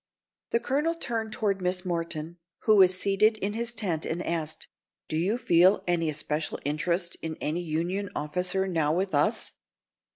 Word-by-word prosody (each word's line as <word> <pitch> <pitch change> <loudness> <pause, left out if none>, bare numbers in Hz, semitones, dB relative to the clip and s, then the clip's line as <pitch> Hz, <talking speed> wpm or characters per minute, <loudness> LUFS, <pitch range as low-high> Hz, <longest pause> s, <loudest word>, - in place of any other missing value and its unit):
The 235 - +2
colonel 295 +7 0
turned 225 -8 -2
toward 200 -3 -1
Miss 180 +1 -1
Morton, 170 -1 -3 0.2
who 215 -1 +5
was 185 -1 +6
seated 215 +2 +3
in 205 0 -2
his 235 +1 -1
tent, 185 -9 -2
and 170 +2 -3
asked: 160 -2 -3 0.4
"Do - - -3
you 185 +8 +1
feel 185 -3 +4
any 170 -2 +1
especial 155 +1 -2
interest 170 +4 -1
in 160 -1 -4
any 155 +4 -2
Union 175 +5 -2
officer 180 +5 -1
now 160 -5 +1
with 190 0 -1
us?" 145 0 +1
180 Hz, 160 wpm, -27 LUFS, 160-200 Hz, 0.4 s, was